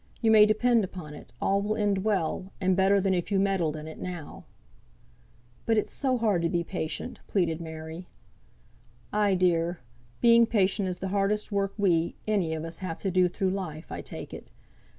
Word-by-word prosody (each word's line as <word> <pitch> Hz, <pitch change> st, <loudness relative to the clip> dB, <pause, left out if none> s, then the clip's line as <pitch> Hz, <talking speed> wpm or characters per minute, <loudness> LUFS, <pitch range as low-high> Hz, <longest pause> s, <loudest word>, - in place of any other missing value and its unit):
You 225 Hz, -2 st, +3 dB
may 215 Hz, -1 st, +8 dB
depend 230 Hz, +1 st, +3 dB
upon 180 Hz, -5 st, -7 dB
it, 150 Hz, -, -12 dB
all 200 Hz, +1 st, +1 dB
will 210 Hz, +1 st, -1 dB
end 205 Hz, -3 st, 0 dB
well, 190 Hz, -2 st, -1 dB
and 185 Hz, -1 st, +2 dB
better 195 Hz, +1 st, +4 dB
than 195 Hz, 0 st, +1 dB
if 175 Hz, +2 st, -2 dB
you 200 Hz, -, +3 dB
meddled 190 Hz, -6 st, +1 dB
in 155 Hz, 0 st, -7 dB
it 160 Hz, -, -9 dB
now." 175 Hz, -4 st, -7 dB, 1.2 s
"But 225 Hz, -1 st, +3 dB
it's 215 Hz, -, 0 dB
so 260 Hz, -2 st, +1 dB
hard 210 Hz, -7 st, +1 dB
to 170 Hz, -, +1 dB
be 170 Hz, 0 st, 0 dB
patient," 160 Hz, -4 st, -4 dB
pleaded 170 Hz, -4 st, 0 dB
Mary. 160 Hz, +2 st, -7 dB, 1.1 s
"Ay, 205 Hz, -2 st, +3 dB
dear; 175 Hz, -1 st, +1 dB, 0.4 s
being 235 Hz, -1 st, +6 dB
patient 200 Hz, -2 st, +1 dB
is 180 Hz, -, -4 dB
the 190 Hz, +1 st, -4 dB
hardest 205 Hz, +2 st, 0 dB
work 200 Hz, -1 st, -1 dB
we, 170 Hz, -5 st, +2 dB
any 190 Hz, -7 st, +1 dB
on 160 Hz, 0 st, -4 dB
us, 165 Hz, 0 st, -6 dB
have 180 Hz, -4 st, -4 dB
to 195 Hz, -, -2 dB
do 180 Hz, 0 st, +4 dB
through 185 Hz, +1 st, -1 dB
life, 175 Hz, -5 st, -5 dB
I -, -, -4 dB
take -, -, -8 dB
it. -, -, -9 dB
190 Hz, 190 wpm, -28 LUFS, 170-205 Hz, 1.2 s, may